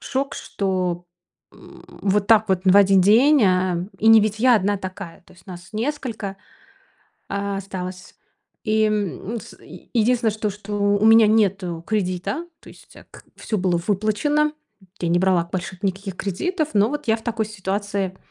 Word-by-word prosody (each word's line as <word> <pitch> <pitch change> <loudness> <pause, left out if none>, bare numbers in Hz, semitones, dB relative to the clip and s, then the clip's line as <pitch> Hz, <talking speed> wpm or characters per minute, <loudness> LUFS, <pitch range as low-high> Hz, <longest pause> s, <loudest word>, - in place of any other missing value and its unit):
шок, 270 +1 -3
что, 180 -3 -3 0.5
м, - - -16 0.2
вот 200 0 +1
так 220 -2 +5
вот 190 -1 +1
в 190 +1 +5
1 195 -1 +6
день 245 +8 +5
э 185 -1 +1
И 220 - -1
не 225 -1 +8
ведь 215 0 -1
я 250 +2 +5
одна 205 +1 0
такая. 185 -2 -8
То - - -19
есть 180 -1 -21
нас 175 +1 -10
несколько, 225 -5 -4 0.9
а, 200 0 -3
осталось. 185 -1 -7 0.5
И, 215 0 +2
м, 210 0 -2
ну, 235 - -3
с, - - -13 0.4
единственное 230 0 +2
что 215 0 -3
что, 205 +1 -8
у 205 +1 +1
меня 225 -1 +7
нету 190 -6 +1
кредита. 205 - -2 0.2
То - - -14
есть, - - -18
а, - - -15
к - - -14
всё 215 - -3
было 180 -2 +1
выплачено. 220 +10 +1 0.5
Я 170 - -1
не 175 - +2
брала 180 -2 +2
больших 185 +1 -5
никаких 195 0 -3
кредитов. 310 - -2
Но 210 +2 +3
вот 295 -2 -5
я 220 - +3
в 225 - -15
такой 225 -2 -2
ситуации 200 -1 -3
205 Hz, 170 wpm, -22 LUFS, 185-220 Hz, 0.9 s, не